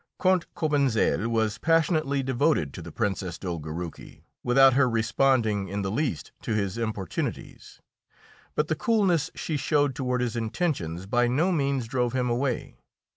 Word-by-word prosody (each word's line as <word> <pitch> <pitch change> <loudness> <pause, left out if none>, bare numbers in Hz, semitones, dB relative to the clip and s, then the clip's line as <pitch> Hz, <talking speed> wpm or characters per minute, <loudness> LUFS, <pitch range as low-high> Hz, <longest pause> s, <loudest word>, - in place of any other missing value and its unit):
Count 185 -2 +2
Cobentzel 140 -8 +1
was 110 -2 0
passionately 155 -3 +2
devoted 130 - +1
to - - -7
the 85 0 -9
Princess 95 -4 -2
Dolgoruki, 85 -2 -6 0.2
without 135 +1 +6
her 130 -1 +4
responding 115 -3 +1
in 100 +2 -3
the 95 - -2
least 140 +5 -2
to 115 - -2
his 100 -3 -1
importunities; 110 -6 -4 0.8
but 150 - +1
the 155 - +1
coolness 195 - +2
she 155 - -2
showed 145 -1 +1
toward 125 -1 -1
his 120 -2 -1
intentions 110 - -2
by 120 +4 +2
no 155 +10 +2
means 140 -6 0
drove 125 0 0
him 125 -2 0
away. 125 - -2
125 Hz, 145 wpm, -26 LUFS, 105-145 Hz, 0.8 s, without